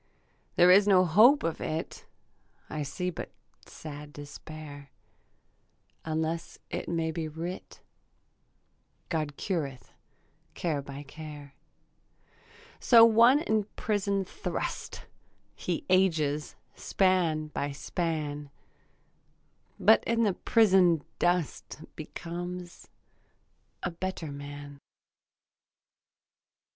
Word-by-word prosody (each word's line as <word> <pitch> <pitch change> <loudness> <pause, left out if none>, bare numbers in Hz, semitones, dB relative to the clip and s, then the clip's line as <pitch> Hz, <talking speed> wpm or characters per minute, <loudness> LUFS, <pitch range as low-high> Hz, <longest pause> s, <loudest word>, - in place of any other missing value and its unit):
There 180 +1 +7
is 200 +2 +6
no 185 -2 +6
hope 220 - +6
of 165 - -2
it; 160 +1 -4 0.6
I 155 - -3
see 180 +6 -3
but - - -7 0.4
sad 150 -1 -9
despair, 145 0 -10 1.1
Unless 160 +1 -3
it - - -4
may 165 -1 0
be 160 0 -3
writ 165 +4 -7 1.3
God 155 -4 -2
cureth 145 -9 -4 0.6
care 155 -5 -1
by 140 +1 -8
care. 145 -1 -10 1.3
So 230 -2 +8
one 235 +5 +6
in 220 -9 +1
prison 200 -2 0
thrust; - - -5 0.5
He 175 - -3
ages 160 -6 +2 0.2
span 170 -5 +1
by 145 -1 -3
span, 150 -1 -3 1.3
But 220 +4 +6
in 230 0 +2
the 205 -3 +2
prison 185 -8 +4 0.2
dust 175 -4 -1 0.2
Becomes 175 +3 -7 1.0
a 180 - -1
better 170 -3 -5
man. 145 0 -9
165 Hz, 90 wpm, -29 LUFS, 150-185 Hz, 1.3 s, So